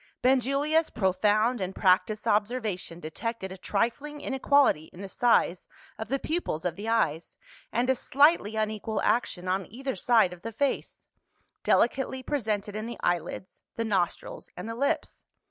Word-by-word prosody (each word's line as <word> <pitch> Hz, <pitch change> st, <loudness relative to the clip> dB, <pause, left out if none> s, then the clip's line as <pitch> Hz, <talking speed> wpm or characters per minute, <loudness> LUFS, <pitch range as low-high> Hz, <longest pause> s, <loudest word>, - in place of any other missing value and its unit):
Benjulia's 275 Hz, +5 st, +2 dB
profound 210 Hz, +4 st, +2 dB
and 185 Hz, +1 st, -3 dB
practised 205 Hz, +3 st, +2 dB
observation 205 Hz, -5 st, -1 dB
detected 190 Hz, +5 st, -5 dB
a -, -, -6 dB
trifling 240 Hz, +10 st, -2 dB
inequality 270 Hz, -, +2 dB
in 175 Hz, -, -13 dB
the 200 Hz, -, -5 dB
size 190 Hz, -4 st, +2 dB, 0.3 s
of 220 Hz, -, -4 dB
the 275 Hz, -, 0 dB
pupils 275 Hz, -, -3 dB
of 175 Hz, -2 st, -1 dB
the 210 Hz, +3 st, -5 dB
eyes, 170 Hz, -8 st, 0 dB, 0.3 s
and 240 Hz, +2 st, +1 dB
a 260 Hz, -, +4 dB
slightly 275 Hz, -4 st, +3 dB
unequal 215 Hz, 0 st, -2 dB
action 185 Hz, -6 st, 0 dB
on 185 Hz, +1 st, -1 dB
either 265 Hz, +3 st, -4 dB
side 225 Hz, -7 st, +3 dB
of 175 Hz, -, -13 dB
the 230 Hz, -, -5 dB
face 280 Hz, +5 st, -2 dB, 0.5 s
delicately 260 Hz, +1 st, +1 dB
presented 215 Hz, -7 st, -2 dB
in 215 Hz, +1 st, -4 dB
the 235 Hz, -, -6 dB
eyelids, 175 Hz, +2 st, -2 dB
the 230 Hz, -, -2 dB
nostrils, 190 Hz, -5 st, -2 dB
and 180 Hz, -, -6 dB
the 230 Hz, -, -4 dB
lips. 275 Hz, +5 st, -2 dB
220 Hz, 150 wpm, -28 LUFS, 190-255 Hz, 0.5 s, a